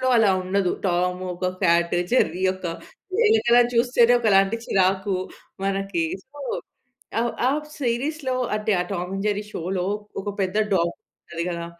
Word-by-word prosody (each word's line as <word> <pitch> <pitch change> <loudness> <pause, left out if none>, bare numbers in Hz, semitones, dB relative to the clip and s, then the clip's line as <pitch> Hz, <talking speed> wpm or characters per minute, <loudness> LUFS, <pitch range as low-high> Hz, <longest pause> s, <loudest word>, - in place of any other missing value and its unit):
లో - - +1
అలా 220 -3 +5
ఉండదు. 185 0 0 0.2
టామ్ 180 0 0
ఒక 180 +1 -3 0.2
కాట్ 170 0 +3 0.2
జెర్రీ 185 -7 +2
ఒక 185 - -14 0.5
వెనకల 435 - +5 0.2
చూస్తేనే 240 0 +4
ఒకలాంటి 200 -1 +4
చిరాకు 190 0 +1 0.5
మనకి. 195 -3 -1 0.2
సో, 290 +2 -14 0.8
ఆహ్, 235 0 0 0.2
ఆ - - +3 0.3
సీరీస్‌లో 260 +3 -1 0.2
అంటే 215 0 0
ఆ - - +2
'టామ్ 180 0 -3
అండ్ 195 +1 -3
జెర్రీ' 205 0 -2
షో‌లో 180 +2 -2 0.4
ఒక 205 - -6
పెద్ద 190 +1 -1 0.2
డాగ్ 170 -1 +2 0.3
ఉంటది 170 0 -5
కదా! 170 -1 -4
195 Hz, 140 wpm, -24 LUFS, 180-235 Hz, 0.8 s, అలా